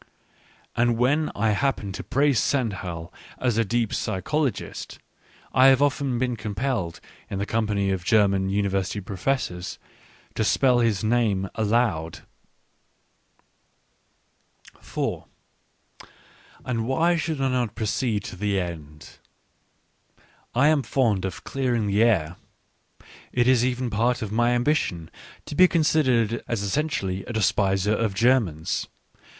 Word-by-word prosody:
And 120 0 +2
when 145 +6 +2
I 110 +1 +1
happen 105 -3 -1
to - - -6
praise 140 -3 +2
Stendhal 90 - -2 0.2
as 120 -3 0
a - - +4
deep 115 +1 -1
psychologist, 130 - -2 0.6
I 130 +1 +6
have 135 -1 +6
often 140 -3 +1
been 125 0 -1
compelled, 105 -5 -3 0.3
in 100 - -4
the 100 - -1
company 105 -3 0
of 95 -2 -2
German 100 -2 +3
University 100 0 -1
Professors, 95 -1 -3 0.6
to 110 - -1
spell 125 +3 +3
his 115 -4 +1
name 110 -5 +1
aloud. 110 -7 0 2.6
4 - - -4 1.4
And 115 -2 -2
why 165 +6 +2
should 160 -2 -2
I 135 -1 +1
not 125 -4 -1
proceed 110 -1 -1
to - - -7
the 100 +1 0
end? 75 -4 -8 1.4
I 135 +5 +5
am 155 -2 +3
fond 115 -8 +1
of 95 - -6
clearing 125 -5 -1
the 100 +1 +1
air. 90 -8 +2 0.9
It 120 0 +2
is 130 -2 +4
even 125 -1 -1
part 120 +3 +1
of 105 - -5
my 120 +2 +2
^ambition 120 - 0 0.4
to - - -7
be 185 +5 +6
considered 130 - +2
as 115 -4 -2
essentially 100 -5 -1
a 120 - -6
despiser 100 -1 +1
)of 110 -3 -1
Germans. 110 -10 +1
115 Hz, 125 wpm, -24 LUFS, 100-130 Hz, 2.6 s, I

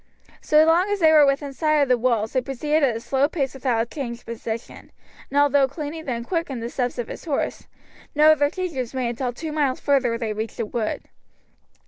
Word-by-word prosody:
So 305 +1 +5
long 345 +5 +3
as 410 0 0
they 320 -3 +5
were 300 -2 +7
within 275 0 -1
sight 305 +1 +2
of - - -1
the 250 - +4
walls 230 -3 0
they 255 - +2
proceeded 295 +4 -1
at 260 -5 +2
a - - -3
slow 270 +4 +1
pace 275 -6 -2
without 240 -4 -1
change 240 -5 -4
of - - -29
position, 230 0 -7 0.4
and 280 - -3
although 285 -1 +4
Cluny 300 +3 -6
then 245 -6 -4
quickened 280 -6 -3
the 235 - -4
steps 250 -1 -2
of 240 - -3
his - - -9
horse, 290 -4 -2 0.5
no 305 +1 +7
other 290 -2 +3
change 365 -1 -4
was 255 -1 -4
made 255 -2 -1
until 245 +1 -2
two 310 +6 -6
miles 285 -4 0
further 260 -5 +1
they 225 -2 -3
reached 220 +2 -5
a 230 - 0
wood. 220 0 -3
270 Hz, 215 wpm, -23 LUFS, 240-300 Hz, 0.5 s, were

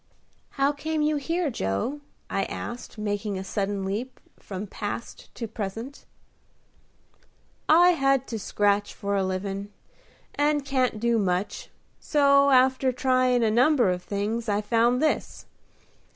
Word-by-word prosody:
"How 275 +1 +3
came 305 +1 -2
you 300 0 +1
here, 330 +2 -1
Joe?" 100 - -2 0.3
I - - -1
asked, 240 -1 -7
making 205 -1 -2
a 190 - -4
sudden 195 0 -2
leap 220 +7 -4 0.2
from 195 +1 -6
past 205 +3 -6
to 230 - -4
present. 225 +6 -6 1.6
"I 345 +3 +7
had 275 -5 +2
to 225 - -3
scratch 205 0 0
for 200 0 -2
a 195 - +1
livin', 195 +2 -3 0.6
and 290 0 +1
can't 255 -5 0
do 235 0 +2
much: 185 0 -2 0.3
so, 280 -1 +4
after 260 0 +4
tryin' 255 -1 +2
a 220 - +2
number 245 -2 +4
of 180 0 -3
things, 215 +4 -3
I 205 0 +1
found 235 +5 +2
this. 310 - -1
235 Hz, 135 wpm, -26 LUFS, 205-275 Hz, 1.6 s, I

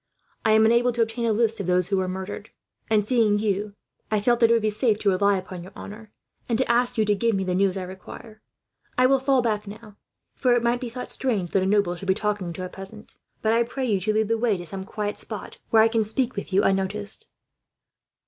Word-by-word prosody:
I 215 - +3
am 220 0 +5
unable 235 +2 +4
to 235 0 +2
obtain 230 +1 -3
a - - +2
list 225 +1 +1
of 195 - -4
those 180 0 +1
who 195 - +1
were 185 -1 0
murdered 190 +3 -6 0.4
and, 210 -2 +2
seeing 220 -3 +3
you, 205 -1 -2 0.3
I 215 - +1
felt 240 +3 +2
that 230 - +5
it - - +5
would 230 - +3
be 215 - +1
safe 215 0 +1
to 205 -2 +1
rely 200 +1 +2
upon 185 -1 -7
your 185 +3 -12
honour, 215 +1 -10 0.4
and 230 - +1
to 260 - +1
ask 245 +1 +1
you 220 - +3
to 210 - +3
give 230 +2 +1
me 195 - -1
the 185 -1 -1
news 195 +1 +1
I 190 - -3
require. 215 +4 -11 0.6
I 255 - +5
will 270 +1 +4
fall 265 -1 +2
back 210 -3 -1
now, 210 0 -11 0.4
for 250 -2 +2
it 240 - +1
might 240 +1 +1
be 245 - -4
thought 250 +2 -7
strange 210 -10 -1
that 195 - +2
a 190 - 0
noble 200 -3 +2
should 195 +2 -9
be 190 - +3
talking 205 -4 -2
to 185 +2 -5
a - - -4
peasant; 195 +3 -8 0.2
but 220 0 +3
I 230 - +3
pray 250 +3 -2
you 210 -5 +1
to 200 +4 0
lead 220 0 +1
the 230 0 +1
way 225 -4 +1
to 175 - -8
some 190 +3 -7
quiet 210 +1 -4
spot, 215 -3 -8
where 220 -1 +6
I - - +5
can 225 -1 +1
speak 235 +4 -1
with 200 - -5
you 195 +2 +3
unnoticed." 200 - +1
215 Hz, 255 wpm, -24 LUFS, 195-230 Hz, 0.6 s, where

